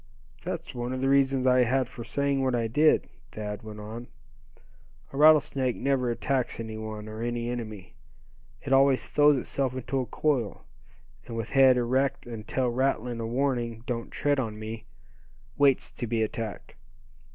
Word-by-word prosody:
"That's - - -5
one 120 +1 -3
of 130 - -3
the 135 - +2
reasons 135 -1 +3
I 125 -1 +5
had 130 +1 +1
for 120 -1 -9
saying 140 +2 0
what 130 -2 +1
I 115 -1 0
did," 150 +8 +3 0.2
Thad 105 -1 -5
went 110 -1 -9
on, 110 +3 -7 1.1
"a - - -5
rattlesnake 145 -4 +4
never 135 -3 0
attacks 130 +1 -1
any 110 -1 -5
one, 110 -1 -6
or 110 +1 -7
any 120 0 -2
enemy. 110 -5 -6 0.7
It 135 - -1
always 135 -1 +4
throws 145 -1 +4
itself 130 0 -2
into 130 +1 -2
a 125 - -2
coil, 130 -9 -1 0.6
and 115 -2 -6
with 115 -1 -4
head 135 -2 +6
erect, 130 +3 0
and 115 -3 -8
tail 130 -2 0
rattling 125 -1 0
a 115 - -3
warning 120 -2 -1
'don't 115 -2 -3
tread 145 -1 0
on 110 -4 -3
me,' 110 +1 -7 0.7
waits 140 -3 +3
to 120 0 -5
be 110 0 +1
attacked. 110 -1 -5
125 Hz, 165 wpm, -27 LUFS, 115-135 Hz, 1.1 s, head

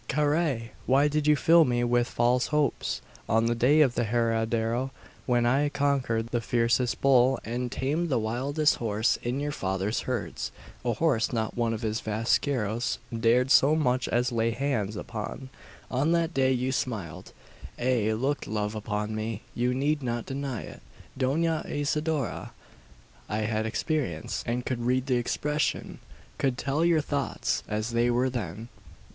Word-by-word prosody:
"Carrai! 145 -5 0 0.2
Why 135 +3 +4
did 150 0 0
you 150 - +6
fill 165 +4 +6
me 120 -3 +1
with 120 0 +2
false 125 +1 +1
hopes? 150 -2 0 0.3
On 115 +1 +3
the 120 - +2
day 130 +6 +4
of 135 -5 +4
the 120 - 0
herradero, 115 +2 0 0.4
when 120 -2 +2
I 140 +4 +3
conquered 135 -6 0
the 120 - 0
fiercest 120 +1 +1
bull 130 -1 +4
and 120 +2 -3
tamed 155 +6 -1
the 130 - +2
wildest 135 +8 +1
horse 110 +1 +1
in 125 +3 -2
your 145 +1 -2
father's 95 -3 -1
herds 105 - -3 0.3
a 120 -1 +1
horse 120 -2 +1
not 110 -3 -2
one 115 -1 0
of 110 -1 -4
his 110 0 -1
vaqueros 115 +1 0 0.2
dared 120 +3 +3
so 145 +3 +6
much 130 -5 +1
as 125 +2 +1
lay 115 -1 +1
hands 115 -4 -1
upon 115 +5 -6 0.4
on 145 +6 +2
that 170 0 +1
day 130 -2 +3
you 130 0 0
smiled 105 - -4 0.5
ay, 120 -4 +1
looked 135 +6 -1
love 105 0 -2
upon 105 0 -3
me. 110 0 -4
You 125 +1 0
need 145 +3 0
not 120 -2 -2
deny 135 -3 -4
it, - - -10 0.3
Dona 160 +5 +1
Isidora! 150 -2 -2 0.8
I 105 - -1
had 110 0 -1
experience, 120 - -2
and 120 +1 -1
could 130 -2 -2
read 130 +1 +1
the 130 -3 +1
expression 150 +5 -1 0.4
could 135 -3 +1
tell 140 +5 0
your 170 -2 +4
thoughts, 145 -1 -1
as 110 +2 -2
they 120 +1 +2
were 125 +2 +1
then. 110 -1 -5
125 Hz, 160 wpm, -27 LUFS, 115-140 Hz, 0.8 s, you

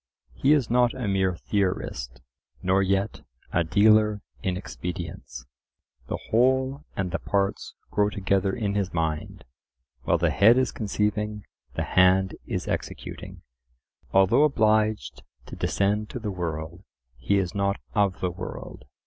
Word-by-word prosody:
He 140 +3 +3
is 140 -6 +2
not 120 0 +3
a 125 -4 -3
mere 95 -2 +1
theorist, 80 - -2 0.4
nor 95 +1 +3
yet 95 +2 0 0.3
a 85 - +3
dealer 105 +4 +4 0.2
in 90 -1 -1
expedients; 90 -3 -6 0.6
the - - -2
whole 130 +4 +2
and 95 -2 -2
the 95 - -1
parts 100 -1 -1 0.2
grow 105 0 +2
together 100 -1 0
in 100 0 -2
his 100 -3 -2
mind; 80 -2 -2 0.6
while - - +2
the - - +1
head 115 +5 +6
is 130 -1 +2
conceiving, 105 0 -2 0.3
the - - -1
hand 95 +1 +4
is - - -3
executing. - - -5 0.7
Although 95 +9 +5
obliged 110 -6 +2 0.2
to - - -9
descend 105 +2 0
to 125 - -5
the 110 -3 -3
world, 85 0 -5 0.3
he 100 - +1
is 90 -3 -1
not 100 0 0
of 100 -3 +1
the 90 - 0
world. 85 -7 -8
100 Hz, 140 wpm, -26 LUFS, 95-110 Hz, 0.7 s, head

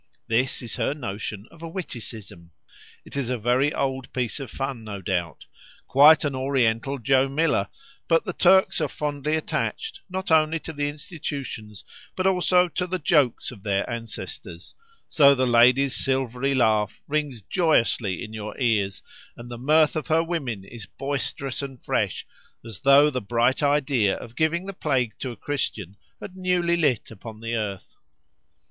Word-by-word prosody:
This 125 +3 0
is 120 - -5
her 140 - 0
notion 105 -5 -5
of 165 - -17
a 165 - -6
witticism. 110 - -7 0.6
It - - -12
is 135 -4 -2
a 125 - 0
very 125 +6 +2
old 135 -3 -2
piece 125 -1 -2
of 135 -4 -6
fun, 135 -3 -4
no 105 -2 -6
doubt—quite 95 - +2
an 145 - -1
Oriental 130 -1 0
Joe 135 +2 +2
Miller; 155 +3 +1 0.4
but 165 -1 +3
the 185 - -3
Turks 190 -1 +4
are 155 - +1
fondly 150 +1 -2
attached, 445 - -3
not 190 -1 -4
only 160 0 +4
to 160 - -7
the 145 -1 -1
institutions, 140 - -7 0.3
but 185 - -2
also 180 -1 +4
to 180 +1 -2
the 185 +1 -2
jokes 145 -8 +2
of 110 -6 -12
their 100 -1 -1
ancestors; 95 - -7 0.3
so 140 -2 +6
the 130 -1 +1
lady's 125 +3 +4
silvery 135 0 0
laugh 110 -4 +2
rings 145 -7 -2
joyously 120 - +1
in 110 -2 -8
your 105 -1 -6
ears, 105 -6 0 0.3
and 120 +1 -10
the 120 - -6
mirth 155 +4 +3
of 155 - -3
her 160 0 +3
women 140 - -3
is 105 0 -10
boisterous 135 0 -4
and 135 -3 -7
fresh, - - -1 0.4
as 110 -4 -8
though 140 +2 +6
the 130 -2 -2
bright 120 +6 +1
idea 140 -7 +2
of 115 0 -11
giving 165 +3 0
the 195 - -6
plague 130 - 0
to 130 - -4
a 120 - -7
Christian 105 - -3 0.2
had 185 - -9
newly 180 -2 +1
lit 145 -11 0
upon 110 +1 -10
the 115 +1 -4
earth. 105 -4 -4
135 Hz, 165 wpm, -24 LUFS, 115-150 Hz, 0.6 s, so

